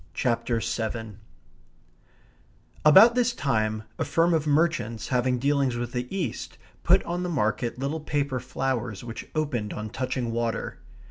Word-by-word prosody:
CHAPTER 120 Hz, -1 st, 0 dB
SEVEN 110 Hz, -1 st, -3 dB, 1.6 s
About 195 Hz, +10 st, +8 dB
this 245 Hz, 0 st, +2 dB
time 110 Hz, -, 0 dB, 0.2 s
a -, -, +2 dB
firm 170 Hz, +1 st, +2 dB
of 155 Hz, -2 st, +1 dB
merchants 145 Hz, -8 st, +1 dB
having 125 Hz, 0 st, +1 dB
dealings 140 Hz, -1 st, +1 dB
with 120 Hz, 0 st, -3 dB
the 125 Hz, -1 st, -3 dB
East 175 Hz, -, -4 dB, 0.2 s
put -, -, +4 dB
on 175 Hz, +1 st, -3 dB
the 180 Hz, -, -2 dB
market 120 Hz, -5 st, 0 dB
little 140 Hz, +5 st, -2 dB
paper 145 Hz, -3 st, -1 dB
flowers 125 Hz, -4 st, -3 dB
which 115 Hz, -1 st, -7 dB
opened 130 Hz, -9 st, -1 dB
on 105 Hz, 0 st, -5 dB
touching 130 Hz, -2 st, -2 dB
water. 115 Hz, 0 st, -2 dB
125 Hz, 140 wpm, -26 LUFS, 115-150 Hz, 1.6 s, About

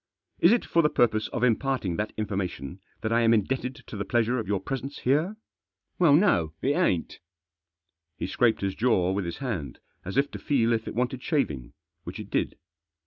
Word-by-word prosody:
" -, -, -63 dB
Is 170 Hz, -, +6 dB
it 235 Hz, -, +2 dB
for 170 Hz, -, +3 dB
the 150 Hz, -, +3 dB
purpose 110 Hz, -5 st, +2 dB
of 120 Hz, -, -3 dB
imparting 125 Hz, -6 st, +1 dB
that 105 Hz, +1 st, -2 dB
information 95 Hz, -6 st, -3 dB, 0.2 s
that 110 Hz, +1 st, -1 dB
I 115 Hz, -, +4 dB
am 115 Hz, 0 st, +5 dB
indebted 125 Hz, +4 st, -1 dB
to -, -, -9 dB
the 100 Hz, -, -2 dB
pleasure 120 Hz, +3 st, +1 dB
of 110 Hz, -, -4 dB
your 100 Hz, -1 st, 0 dB
presence 135 Hz, +7 st, -5 dB
here?" 155 Hz, +11 st, +1 dB, 0.3 s
" -, -, -52 dB
Well 165 Hz, -5 st, +6 dB
no; 85 Hz, -, +3 dB
it 135 Hz, -, 0 dB
ain't" 145 Hz, -, 0 dB, 1.0 s
He -, -, -3 dB
scraped 120 Hz, -2 st, +2 dB
his 100 Hz, -1 st, -1 dB
jaw 100 Hz, -6 st, +2 dB
with 95 Hz, -1 st, -1 dB
his 85 Hz, -, -4 dB
hand, 95 Hz, -, -4 dB, 0.3 s
as 95 Hz, +7 st, -5 dB
if 140 Hz, +1 st, +2 dB
to -, -, -7 dB
feel 120 Hz, -5 st, +2 dB
if 110 Hz, -1 st, -2 dB
it -, -, -5 dB
wanted 125 Hz, +1 st, -1 dB
shaving, 75 Hz, -, -1 dB, 0.3 s
which -, -, -7 dB
it -, -, -8 dB
did. -, -, -1 dB
115 Hz, 200 wpm, -27 LUFS, 100-135 Hz, 1.0 s, Is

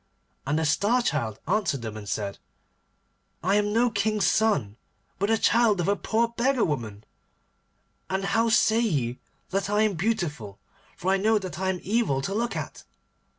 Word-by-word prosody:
And 145 Hz, +2 st, +1 dB
the 160 Hz, -, 0 dB
Star 215 Hz, -, +2 dB
Child 120 Hz, -, -1 dB
answered 170 Hz, -, 0 dB
them 110 Hz, -2 st, -5 dB
and 105 Hz, -2 st, -8 dB
said, 100 Hz, -2 st, -3 dB, 1.0 s
'I 190 Hz, +3 st, +2 dB
am 205 Hz, 0 st, +1 dB
no 235 Hz, +2 st, +2 dB
king's 215 Hz, -1 st, 0 dB
son, 145 Hz, -, +1 dB, 0.4 s
but 200 Hz, +2 st, 0 dB
the 225 Hz, -, +3 dB
child 225 Hz, -3 st, +3 dB
of 175 Hz, -, 0 dB
a 200 Hz, -, +3 dB
poor 230 Hz, +3 st, 0 dB
beggar 240 Hz, +1 st, +1 dB
woman. 110 Hz, -8 st, -4 dB, 1.1 s
And 190 Hz, +1 st, -1 dB
how 225 Hz, +3 st, +2 dB
say 225 Hz, 0 st, +4 dB
ye 135 Hz, -, -1 dB, 0.3 s
that 195 Hz, +1 st, -1 dB
I 210 Hz, +1 st, +3 dB
am 215 Hz, -2 st, +2 dB
beautiful, 160 Hz, -, -2 dB, 0.4 s
for 185 Hz, -, 0 dB
I 195 Hz, -, +3 dB
know 215 Hz, +3 st, +3 dB
that 185 Hz, -5 st, -5 dB
I 190 Hz, 0 st, 0 dB
am 185 Hz, -1 st, -1 dB
evil 205 Hz, -, +1 dB
to 195 Hz, -, -2 dB
look 235 Hz, +3 st, -1 dB
at? -, -, -6 dB
195 Hz, 175 wpm, -26 LUFS, 145-220 Hz, 1.1 s, say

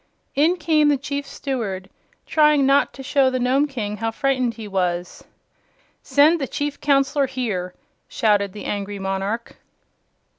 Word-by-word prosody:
In 320 Hz, +6 st, +3 dB
came 310 Hz, -3 st, +3 dB
the 290 Hz, -, +3 dB
Chief 280 Hz, +1 st, -4 dB
Steward, 210 Hz, -9 st, -4 dB, 0.4 s
trying 300 Hz, -3 st, +4 dB
not 275 Hz, +1 st, +3 dB
to 270 Hz, -, -9 dB
show 275 Hz, -1 st, +3 dB
the 255 Hz, -, -1 dB
Nome 260 Hz, +4 st, +2 dB
King 210 Hz, -7 st, -4 dB
how 225 Hz, +2 st, -1 dB
frightened 255 Hz, 0 st, 0 dB
he 220 Hz, -2 st, -8 dB
was. 180 Hz, -2 st, -2 dB, 0.8 s
"Send 290 Hz, +4 st, +4 dB
the 270 Hz, -, -1 dB
Chief 290 Hz, +2 st, -4 dB
Counselor 275 Hz, 0 st, +2 dB
here!" 215 Hz, -9 st, -3 dB, 0.3 s
shouted 205 Hz, -3 st, +1 dB
the 205 Hz, +1 st, -9 dB
angry 205 Hz, 0 st, -3 dB
monarch. 195 Hz, +4 st, -3 dB
255 Hz, 145 wpm, -22 LUFS, 205-285 Hz, 0.8 s, trying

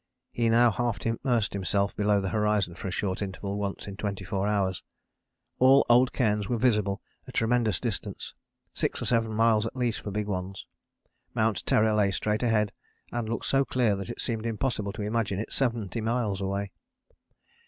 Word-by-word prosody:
He 115 Hz, -1 st, +1 dB
now 120 Hz, +1 st, +5 dB
half 120 Hz, 0 st, -1 dB
immersed 115 Hz, -1 st, 0 dB
himself 100 Hz, 0 st, 0 dB
below 105 Hz, -1 st, +2 dB
the 95 Hz, -1 st, -2 dB
horizon 105 Hz, -4 st, +1 dB
for 90 Hz, -, -6 dB
a -, -, -1 dB
short 95 Hz, +1 st, -2 dB
interval 100 Hz, +1 st, -4 dB
once 100 Hz, -1 st, -4 dB
in 100 Hz, -1 st, -7 dB
24 100 Hz, -1 st, -2 dB
hours. 95 Hz, -3 st, 0 dB, 0.8 s
All 135 Hz, +2 st, +6 dB
old 125 Hz, +2 st, +5 dB
cairns 105 Hz, -5 st, 0 dB
were 120 Hz, -, +1 dB
visible 105 Hz, -5 st, +1 dB, 0.2 s
a -, -, -8 dB
tremendous 115 Hz, -1 st, +1 dB
distance, 115 Hz, -7 st, -4 dB, 0.4 s
six -, -, -1 dB
or -, -, -4 dB
seven 115 Hz, -2 st, +1 dB
miles 110 Hz, 0 st, +3 dB
at -, -, -8 dB
least 120 Hz, -3 st, -1 dB
for -, -, -5 dB
big 105 Hz, +1 st, -2 dB
ones. 95 Hz, -1 st, -4 dB, 0.7 s
Mount 110 Hz, -2 st, +1 dB
Terror 110 Hz, 0 st, +4 dB
lay 105 Hz, -2 st, +3 dB
straight 105 Hz, +3 st, -1 dB
ahead 110 Hz, -4 st, +2 dB, 0.4 s
and 120 Hz, -2 st, -3 dB
looked 115 Hz, -, -3 dB
so 135 Hz, 0 st, +3 dB
clear 120 Hz, -6 st, +1 dB
that 100 Hz, -1 st, -6 dB
it -, -, -6 dB
seemed 115 Hz, -2 st, -2 dB
impossible 110 Hz, -3 st, -1 dB
to 105 Hz, -, -5 dB
imagine 105 Hz, -2 st, -1 dB
it 110 Hz, -, -4 dB
70 115 Hz, -4 st, -1 dB
miles 110 Hz, -4 st, -1 dB
away. 100 Hz, +1 st, -2 dB
105 Hz, 175 wpm, -28 LUFS, 100-115 Hz, 0.8 s, All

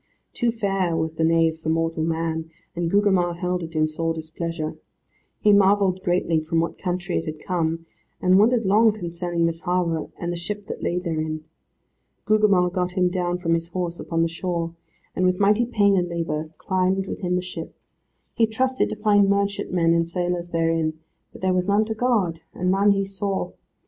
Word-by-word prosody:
Too 240 Hz, -1 st, +1 dB
fair 195 Hz, -6 st, 0 dB
was 160 Hz, -1 st, -1 dB
the 160 Hz, -, -1 dB
nave 165 Hz, 0 st, +3 dB
for 160 Hz, -, -3 dB
mortal 165 Hz, 0 st, 0 dB
man, 160 Hz, 0 st, -2 dB, 0.3 s
and 170 Hz, -1 st, -1 dB
Gugemar 190 Hz, -3 st, +2 dB
held 180 Hz, +1 st, -2 dB
it 165 Hz, -1 st, -7 dB
in 155 Hz, 0 st, +3 dB
sore 165 Hz, +1 st, -2 dB
displeasure. 160 Hz, 0 st, -4 dB, 0.6 s
He 210 Hz, -, +4 dB
marvelled 195 Hz, -2 st, +4 dB
greatly 175 Hz, -3 st, +1 dB
from 160 Hz, +1 st, -1 dB
what 165 Hz, -, -2 dB
country 180 Hz, -1 st, -2 dB
it 165 Hz, -, -6 dB
had 155 Hz, -1 st, -5 dB
come, 165 Hz, -2 st, -2 dB, 0.3 s
and 185 Hz, +1 st, +4 dB
wondered 230 Hz, +1 st, +3 dB
long 215 Hz, +3 st, +5 dB
concerning 175 Hz, -3 st, -2 dB
this 165 Hz, 0 st, -2 dB
harbour, 175 Hz, -3 st, 0 dB
and 175 Hz, 0 st, -3 dB
the -, -, -4 dB
ship 205 Hz, +4 st, -5 dB
that -, -, -6 dB
lay 175 Hz, -, -1 dB
therein. 155 Hz, -3 st, -2 dB, 0.8 s
Gugemar 205 Hz, -4 st, +3 dB
got 180 Hz, 0 st, -1 dB
him 180 Hz, -1 st, +2 dB
down 180 Hz, -1 st, -1 dB
from 170 Hz, -2 st, 0 dB
his 165 Hz, 0 st, -1 dB
horse 175 Hz, -1 st, -3 dB
upon 165 Hz, 0 st, 0 dB
the -, -, +2 dB
shore, 170 Hz, 0 st, -3 dB, 0.4 s
and 185 Hz, -, 0 dB
with 185 Hz, 0 st, +2 dB
mighty 210 Hz, +4 st, +3 dB
pain 205 Hz, -4 st, +3 dB
and 175 Hz, -2 st, +1 dB
labour 160 Hz, -2 st, -3 dB
climbed 190 Hz, 0 st, 0 dB
within 180 Hz, -2 st, -2 dB
the 180 Hz, -, -1 dB
ship. 180 Hz, -3 st, -7 dB, 0.6 s
He 225 Hz, -, +3 dB
trusted 260 Hz, +4 st, 0 dB
to -, -, -3 dB
find 205 Hz, -2 st, +3 dB
merchantmen 200 Hz, -4 st, +1 dB
and 170 Hz, 0 st, +1 dB
sailors 175 Hz, 0 st, -2 dB
therein, 165 Hz, -1 st, 0 dB, 0.4 s
but -, -, -13 dB
there 185 Hz, 0 st, +2 dB
was 180 Hz, 0 st, 0 dB
none 205 Hz, +2 st, +3 dB
to 220 Hz, -, -2 dB
guard, 215 Hz, -8 st, 0 dB
and 180 Hz, +1 st, 0 dB
none 200 Hz, +2 st, +3 dB
he 195 Hz, 0 st, 0 dB
saw. 195 Hz, 0 st, -3 dB
180 Hz, 185 wpm, -23 LUFS, 165-195 Hz, 0.8 s, long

